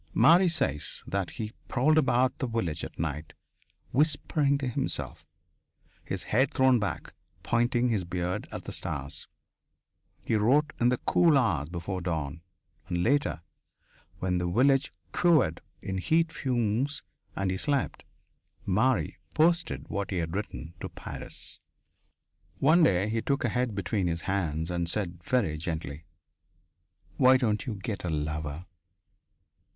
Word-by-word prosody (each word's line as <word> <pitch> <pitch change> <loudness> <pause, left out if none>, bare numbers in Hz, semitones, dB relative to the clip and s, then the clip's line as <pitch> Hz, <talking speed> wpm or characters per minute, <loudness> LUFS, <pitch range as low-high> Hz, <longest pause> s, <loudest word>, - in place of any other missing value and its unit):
Marie 180 +3 +6
says 135 - -1
that 95 -3 -2
he 110 0 -6
prowled 135 +5 +3
about 130 -4 +3
the 130 - -1
village 90 -10 -2
at - - -7
night, 75 -1 -3 0.6
whispering 145 0 +2
to 140 -2 -3
himself, 125 - -2 0.8
his - - -4
head 130 +5 +2
thrown 130 -2 +4
back, 100 - -4 0.3
pointing 120 +1 +2
his 105 -5 +1
beard 90 +1 -3
at - - -6
the - - -6
stars. 70 -3 -4 1.0
He - - 0
wrote 135 +8 +3
in 120 - +4
the 125 - +2
cool 165 +2 +4
hours 80 - +1
before 90 +2 -4
dawn, 80 -3 -3 0.5
and 85 -1 -1
later, 90 - +1 0.7
when 90 -1 0
the 90 0 -1
village 135 +8 +3 0.2
quivered 155 - +3 0.2
in 95 -1 -2
heat 160 - +2
fumes 125 +1 -1 0.3
and 95 -1 0
he 95 - -1
slept, 140 +4 -1 0.6
Marie 110 +7 +1 0.2
posted 170 +2 +2
what 100 -1 -3
he 95 - -2
had 85 0 -2
written 85 -6 -5
to - - -5
Paris. - - -5 1.0
One 155 - +5
day 95 - +4
he 110 +1 -1
took 140 +3 0
her 120 - +2
head 125 -2 -1
between 100 0 -1
his 85 0 -1
hands 85 -4 -1
and 85 -1 -1
said 85 -3 -2
very 95 -12 +1
gently: 80 -3 -4 1.1
"Why 130 0 +7
don't 110 -4 0
you 115 - -2
get 100 +1 -5
a 90 - -2
lover? 75 +1 -3
105 Hz, 140 wpm, -28 LUFS, 85-130 Hz, 1.1 s, Why